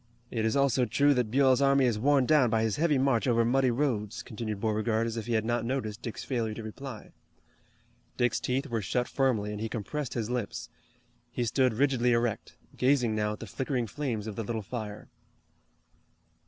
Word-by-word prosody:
"It 110 -2 -1
is 110 - +1
also 135 -2 +3
true 145 +5 +3
that 125 -4 0
Buell's 130 +1 +4
army 140 -1 +4
is 115 -4 +1
worn 135 +2 +3
down 140 -3 +4
by 110 0 +1
his 110 -2 0
heavy 150 -2 +2
march 130 -2 +2
over 115 -1 +3
muddy 130 +2 +3
roads," 115 -5 -1
continued 110 -2 -5
Beauregard 110 +1 0
as 115 -1 -3
if 115 0 -5
he 120 - -1
had 110 -1 +1
not 120 0 0
noticed 115 -3 -3
Dick's 115 - -6
failure 115 -5 -2
to 115 - -7
reply. 110 +1 -8 1.1
Dick's 120 -1 +1
teeth 130 +3 -1
were 115 -5 -2
shut 125 +6 -1
firmly, 120 -7 0
and 105 0 -5
he 110 - -2
compressed 125 +5 -4
his 115 -1 -2
lips. 120 -5 -3 0.6
He 120 0 -2
stood 130 +1 +2
rigidly 125 -2 +2
erect, 115 -2 -1 0.2
gazing 125 -3 +2
now 105 0 0
at - - -10
the - - -5
flickering 125 +3 -2
flames 115 -2 -3
of 110 -2 -5
the 115 - -3
little 110 0 -3
fire. 105 -1 -6
120 Hz, 195 wpm, -29 LUFS, 110-130 Hz, 1.1 s, Buell's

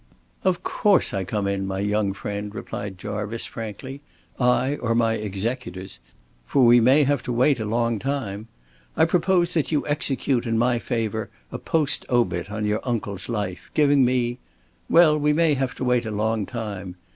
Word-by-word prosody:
"Of 185 -2 +1
course 205 -3 +2
I 95 -2 -1
come 100 +2 -2
in, 100 -1 -1
my 95 0 -3
young 105 0 0
friend," 105 +1 -5
replied 100 -2 -6
Jarvice, 105 +3 -4
frankly. 130 +5 -7 0.4
"I 130 +3 +2
or 115 -1 -1
my 115 -1 +2
executors. 105 -2 -4 0.5
For 130 - +4
we 120 0 +7
may 135 +6 +5
have 145 +1 +1
to 125 - -4
wait 125 +2 +3
a 110 - -2
long 115 0 0
time. 115 -6 -3 0.5
I 160 - +5
propose 175 +1 +2
that 160 -4 0
you 150 - +1
execute 135 -4 0
in 115 0 +1
my 120 +1 +2
favor 110 -2 -2 0.2
a - - -5
post 155 -4 0
obit 110 -7 +1
on 105 0 -3
your 105 +1 0
uncle's 105 -5 -3
life, 100 -6 -4
giving 145 -2 +4
me 125 -1 +1 0.5
well, 160 -3 +6
we 150 0 +2
may 160 0 +3
have 135 -2 -1
to - - -5
wait 125 -2 +1
a - - -2
long 110 0 -1
time. 100 -6 -5
115 Hz, 175 wpm, -24 LUFS, 105-135 Hz, 0.5 s, we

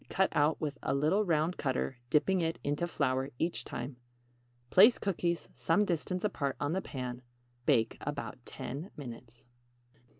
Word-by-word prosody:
Cut 190 0 +2
out 150 +2 +3
with 145 -2 -3
a 135 - 0
little 155 +9 +3
round 165 -1 +1
cutter, 130 -2 -1
dipping 180 +6 +3
it 165 0 0
into 145 +4 0
flour 130 -4 0
each 165 +5 -1
time. 125 +2 -6 0.7
Place 215 +6 +8
cookies 175 -3 -1
some 185 +6 +2
distance 180 +1 -1
apart 140 -10 -1
on 145 +2 0
the 190 - 0
pan. 125 -5 -5 0.5
Bake 115 -6 +3
about 140 -3 -5
10 150 +9 -6
minutes. 120 -4 -9
150 Hz, 145 wpm, -32 LUFS, 130-175 Hz, 0.7 s, Place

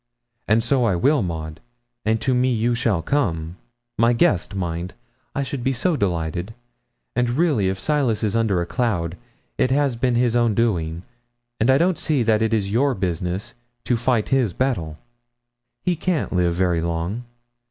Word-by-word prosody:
And 110 +2 +3
so 125 +1 +2
I 100 -5 +2
will, 140 - +3
Maud, 80 -3 -4 0.5
and 110 +1 +2
to 130 - +1
me 125 +1 +2
you 120 +1 +1
shall 115 -8 0
come 85 - -1 0.4
my 115 +1 +5
guest, 100 -4 +1
mind 90 -1 -3 0.4
I 140 - 0
should 135 -2 -5
be 135 - +1
so 160 +8 +1
delighted; 90 - -2 0.6
and 125 -1 +1
really 125 - +2
if 95 0 -3
Silas 135 -7 0
is 105 -1 0
under 110 -6 +2
a - - -1
cloud, 90 -7 -1 0.4
it 130 - +3
has 140 -1 +2
been 120 +1 +1
his 120 -1 +2
own 120 -3 +2
doing, 85 -7 0 0.6
and 110 - +2
I 130 - +6
don't 175 +3 +2
see 145 -6 +1
that 110 -1 +2
it 110 0 +1
is 100 -3 0
your 130 +4 +2
business 95 +4 -3 0.3
to 125 - +1
fight 115 -1 0
his 125 -8 +2
battle. 85 -13 -1 0.9
He 180 - +1
can't 170 - -1
live 90 -2 +2
very 90 -2 +1
long. 85 +8 -3
115 Hz, 175 wpm, -22 LUFS, 90-125 Hz, 0.9 s, I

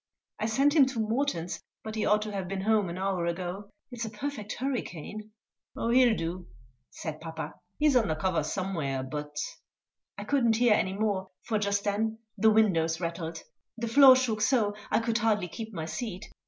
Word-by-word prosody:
I 215 - 0
sent 275 +6 +3
him 280 -4 +7
to 260 -3 -4
Morton's, 215 - -1 0.2
but 220 - -5
he 220 - -1
ought 210 0 +3
to 215 - -5
have 195 -3 -3
been 195 +1 -3
home 210 -2 +2
an 170 - -5
hour 185 -2 -1
ago. 180 +3 -4 0.2
It's 240 -1 -5
a 220 - -3
perfect 215 -1 -5
hurricane!" 215 - -4 0.5
"Oh, 230 - 0
he'll 245 -2 +5
do," 170 +2 -4 0.4
said 155 -1 -6
papa; 160 0 -6 0.2
"he's 295 -2 +3
under 205 -10 +3
cover 170 +2 0
somewhere, 150 -5 -2
but 150 +2 -6 0.4
" - - -64
I - - -5
couldn't 235 -6 +2
hear 240 -2 +5
any 190 -2 +1
more, 195 -2 -1
for 220 -2 0
just 200 -1 0
then 220 +2 0 0.2
the 220 - +4
windows 170 -7 +3
rattled; 165 -1 -4 0.3
the 235 0 -3
floor 265 +2 +9
shook 235 -5 0
so 220 -4 +3 0.2
I - - +2
could 230 0 0
hardly 210 -4 +1
keep 220 +6 -7
my 165 -6 -4
seat. 205 +2 -5
210 Hz, 185 wpm, -29 LUFS, 175-230 Hz, 0.5 s, floor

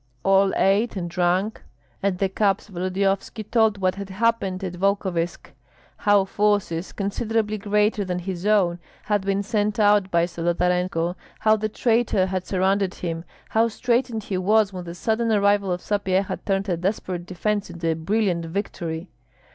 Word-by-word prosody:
All 195 0 +4
ate 205 +4 +2
and 180 -3 -3
drank. 180 +4 0 0.4
At 195 -2 0
the 195 - +1
cups 195 +1 0
Volodyovski 195 +4 -1
told 220 -1 +2
what 185 -1 +1
had 200 0 -7
happened 195 -2 0
at 185 -2 -3
Volkovysk, 185 -2 -1 0.5
how 205 -2 +3
forces, 200 -4 0
considerably 215 +1 -1
greater 210 +1 +1
than 180 -2 -2
his 180 +1 -4
own, 185 -5 +3 0.2
had 205 -1 +1
been 195 +1 0
sent 210 0 0
out 205 -2 +4
by 170 -2 +3
Zolotarenko, 175 0 0 0.3
how 215 0 +5
the 215 0 -2
traitor 225 -4 +2
had 185 -1 -3
surrounded 190 0 +1
him, 165 -1 -4 0.2
how 225 +1 +3
straitened 235 0 0
he 190 -2 -2
was 205 +1 +3
when 180 -1 -6
the 170 0 -7
sudden 225 +4 0
arrival 200 -2 +3
of 180 0 -2
Sapyeha 195 -2 0
turned 195 0 0
a 175 -3 0
desperate 180 -1 -3
defence 205 +3 -2
into 170 -1 -4
a - - +3
brilliant 175 +1 0
victory. 170 -2 -4
195 Hz, 155 wpm, -23 LUFS, 180-210 Hz, 0.5 s, how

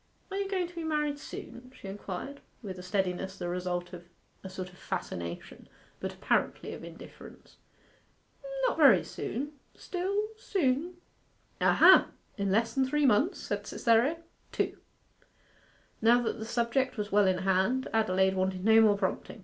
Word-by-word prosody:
'Are 390 - -3
you 395 -1 -2
going 375 -2 0
to 350 - -15
be 335 -1 -5
married 300 -2 -1
soon?' 250 -3 -9
she 195 - -10
inquired, 200 +7 -6 0.2
with 190 -3 -6
a - - -6
steadiness 190 0 -2
the 175 - -4
result 175 0 -3
of 175 -1 -8 0.4
a 190 - -7
sort 185 0 -6
of 180 - -18
fascination, 85 0 -6 0.3
but - - -4
apparently - - -1
of - - -9
indifference. 170 0 -13 1.1
'Not - - +1
very 265 - +7
soon 280 +7 -5 0.2
still, 400 +4 -2
soon.' 345 - 0 0.7
'Ah - - +4
ha! - - +8 0.3
In 200 -1 -1
less 225 +3 +2
than 270 - +2
three 295 +2 +1
months?' 270 - +3
said - - -4
Cytherea. 235 +7 +2 0.3
'Two.' - - -2 1.2
Now 235 +2 +5
that 225 - -2
the 220 - -5
subject 235 +3 0
was 210 0 -3
well 205 -1 +4
in 185 -1 +2
hand, 190 +8 +1
Adelaide 190 -3 +2
wanted 185 0 -1
no 225 0 +7
more 210 -2 +5
prompting. 195 +2 -3
220 Hz, 155 wpm, -30 LUFS, 190-285 Hz, 1.2 s, ha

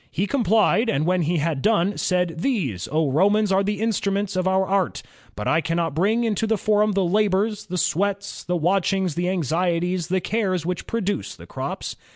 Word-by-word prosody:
He 190 - -1
complied, 225 -1 +2
and 145 -3 0
when 180 +1 +2
he 170 +2 0
had 150 -2 -1
done, 205 0 +2
said, 180 -2 0
'These, 155 - -1
Romans, 185 +8 +2
are 195 +1 +3
the 205 0 -2
instruments 205 -2 -1
of 185 0 0
our 190 0 +2
art, 190 -1 -1 0.3
but 105 - -4
I 160 - +3
cannot 165 0 -1
bring 210 +9 +1
into 220 -1 0
the 220 - +2
foriun 210 0 +2
the 195 -2 +2
labors, 205 +2 +1
the 180 0 -3
sweats, 200 +4 -1
the 180 0 -1
watchings, 190 +1 +1
the 175 +3 -1
anxieties, 175 +1 0
the 185 +1 +1
cares 185 -4 -1
which 180 0 -3
produce 205 -3 -2
the - - -13
crops.' - - -5
190 Hz, 185 wpm, -23 LUFS, 170-205 Hz, 0.3 s, are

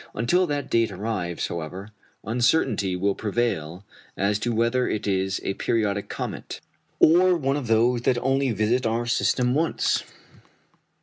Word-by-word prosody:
Until 180 +10 +2
that 145 -2 -2
date 115 -2 +1
arrives, 95 -4 -3
however, 85 +5 -6 0.3
uncertainty 115 - +1
will 100 +2 0
prevail 100 -6 -2 0.3
as 100 +2 +1
to 120 +2 -1
whether 115 +2 +1
it 110 - -2
is 95 -1 0
a - - -1
periodic 100 -2 -1
comet, - - -6 0.4
or 180 +2 +5
one 135 -3 0
of 145 -4 -4
those 115 +2 +3
that 125 0 +1
only 135 +2 +1
visit 115 +3 +1
our 115 +1 -1
system 125 +1 +1
once. 160 +4 0
115 Hz, 140 wpm, -24 LUFS, 100-125 Hz, 0.4 s, or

